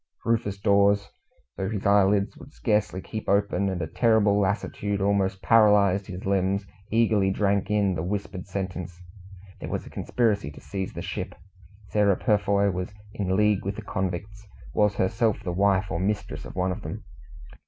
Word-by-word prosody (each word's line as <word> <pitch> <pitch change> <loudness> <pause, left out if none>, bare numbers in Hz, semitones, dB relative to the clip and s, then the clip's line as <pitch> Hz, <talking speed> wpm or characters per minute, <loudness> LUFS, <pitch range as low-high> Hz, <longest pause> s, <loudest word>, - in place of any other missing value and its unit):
Rufus 105 -4 0
Dawes, 100 0 +3 0.5
though 95 0 -2
his 105 -2 -4
eyelids 100 0 +3
would 145 - -14
scarcely 105 -4 0
keep 110 +2 -6
open, 100 0 +2
and 95 -2 -3
a - - -3
terrible 105 +2 +3
lassitude 100 0 -1
almost 100 -1 0
paralysed 105 -3 +4
his 90 0 -7
limbs, 100 0 +1 0.2
eagerly 110 -3 +3
drank 100 +1 +1
in 105 -2 +2
the 80 - -2
whispered 95 0 -4
sentence. 90 -2 -5 0.6
There - - -6
was - - -3
a - - -11
conspiracy 110 -9 0
to - - -12
seize 95 +6 -5
the - - -6
ship. - - -5 0.5
Sarah 100 -2 +3
Purfoy 100 -2 +2
was 90 +2 -4 0.2
in 95 -4 -1
league 105 -2 +3
with 100 +1 -3
the - - -7
convicts 100 +3 -4 0.3
was 105 +3 +2
herself 105 +3 +1
the 90 -3 -3
wife 95 0 +2
or 85 - -1
mistress 100 +1 -2
of - - -9
one 90 0 0
of 95 +3 -5
them. 75 - -6
100 Hz, 165 wpm, -26 LUFS, 95-105 Hz, 0.6 s, paralysed